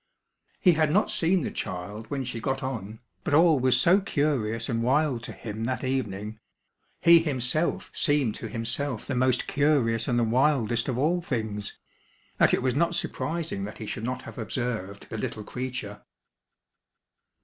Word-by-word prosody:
He 185 - +6
had 155 -2 +2
not 205 +6 +2
seen 175 0 +2
the - - -3
child 100 +5 -5
when 140 -2 -2
she 120 -2 -5
got 135 +3 -2
on, 110 -4 -5 0.2
but 145 - +1
all 160 -2 +5
was 125 0 +4
so 175 +9 +5
curious 130 - 0
and 115 -2 -1
wild 130 0 +2
to - - -6
him 110 0 -5
that 130 +2 -2
evening 110 -5 -3 0.6
he 170 0 +8
himself 150 0 -1
seemed 145 -7 +2
to - - -6
himself 115 +1 -2
the 140 - -3
most 125 0 +2
curious 130 -6 +2
and 120 - +1
the 120 - +3
wildest 120 -1 +2
of 130 -3 -1
all 165 +6 +2
things 110 -9 -3 0.6
that - - +5
it - - +1
was 130 -1 +2
not 170 +4 +1
surprising 165 -13 -2
that 105 - -8
he 110 - -6
should 110 - -5
not 130 +2 -3
have - - -9
observed 110 -4 -4
the 110 - -4
little 105 +1 -4
creature. 125 -4 -5
125 Hz, 170 wpm, -27 LUFS, 115-145 Hz, 0.6 s, he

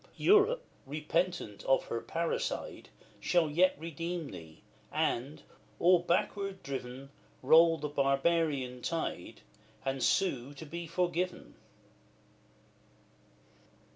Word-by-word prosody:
Europe, 440 +5 +4 0.2
repentant 155 - -2
of 135 - +3
her 115 - -3
parricide, 165 +8 -3 0.3
Shall 170 -4 +2
yet 180 +5 +4
redeem 165 0 -5
thee, 80 -1 -11 0.3
and, 135 +6 -1 0.3
all 180 +1 +5
backward 190 +3 -1
driven, 135 0 -6 0.3
Roll 165 +4 +6
the 150 - -3
barbarian 140 -2 +1
tide, 165 +3 -4 0.4
and 135 0 -1
sue 140 -8 +1
to 160 - -9
be 170 +3 -6
forgiven. 180 +2 -2
160 Hz, 95 wpm, -31 LUFS, 135-175 Hz, 0.4 s, Roll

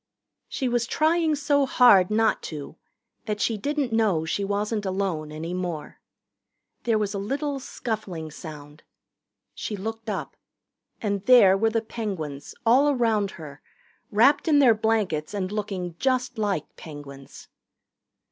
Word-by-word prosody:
She 265 - -2
was 240 -1 0
trying 315 +1 +2
so 285 -1 +2
hard 220 -9 +6
not 220 +1 +2
to 150 -1 -7 0.5
that 210 -1 -2
she 225 - +1
didn't 280 +3 -2
know 205 -8 +2
she 200 +5 -1
wasn't 205 +2 -1
alone 185 -6 -2
any 160 +3 -5
more. 175 -4 -5 0.9
There 230 -2 +3
was 210 -1 -1
a 200 - -3
little 275 +7 -2
scuffling 205 -11 -5
sound. 150 -1 -10 0.7
She 210 - -4
looked 225 +3 -5
up. 200 - -4 0.7
And 200 -2 -1
there 225 -7 +7
were 225 +3 +2
the 225 0 -1
Penguins, 170 -12 -5
all 260 +6 +5
around 225 -7 +1
her, 150 -3 -10 0.5
wrapped 255 +10 +4
in 305 -2 +5
their 260 -5 +6
blankets 210 -7 -1
and 190 -1 -2
looking 195 -5 -4
just 255 -3 0
like 200 -8 -2
Penguins. 145 -3 -11
210 Hz, 140 wpm, -25 LUFS, 175-240 Hz, 0.9 s, there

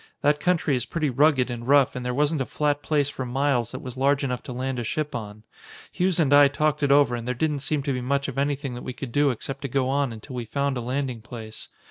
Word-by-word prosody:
That 145 +1 +3
country 165 -3 +1
is 125 -1 -2
pretty 155 -4 -1
rugged 135 -1 +3
and 120 0 -6
rough 140 -2 +4
and 125 - -4
there 125 - -1
wasn't 145 +3 +1
a 130 - -2
flat 145 -1 0
place 145 -3 +1
for 135 -2 -4
miles 125 -2 0
that 130 - -7
was 125 -2 -6
large 140 +2 +2
enough 125 -2 -2
to - - -6
land 130 +1 -3
a - - -2
ship 150 +6 -2
on. 105 -2 -6 0.5
Hughes 180 -1 +1
and 145 -4 +3
I 145 0 +8
talked 150 +1 0
it 140 -1 +2
over 140 -4 +5
and 120 0 -6
there 125 - -1
didn't 150 +2 0
seem 140 +1 -1
to 140 -1 -1
be 125 - -2
much 140 +2 0
of 135 -1 -4
anything 140 -1 -1
that 120 - -7
we 130 - -5
could 125 -1 -7
do 145 +3 +3
except 135 +3 -4
to 140 - -3
go 135 0 0
on 140 -1 +1
until 115 +4 -9
we 120 -1 -4
found 140 +4 -1
a 125 - -3
landing 125 -1 -3
place. 110 -1 -8
135 Hz, 265 wpm, -25 LUFS, 125-145 Hz, 0.5 s, I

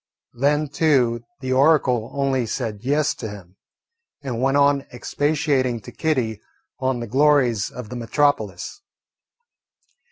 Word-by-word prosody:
Then 145 +4 +1
too 135 -6 +1 0.2
the 130 -1 -1
oracle 130 -5 +3
only 135 -3 0
said 110 -3 -3
"Yes" 145 +4 +1
to 110 - -6
him, 95 -2 -12 0.7
and 125 -4 -3
went 135 +2 +2
on 140 0 +4
expatiating 135 -1 0
to - - -11
Kitty 125 -9 -1 0.4
on 130 -2 -1
the - - -3
glories 130 -5 +3
of 125 -4 -9
the 125 - -6
metropolis. 115 - -1
130 Hz, 125 wpm, -22 LUFS, 115-145 Hz, 0.7 s, on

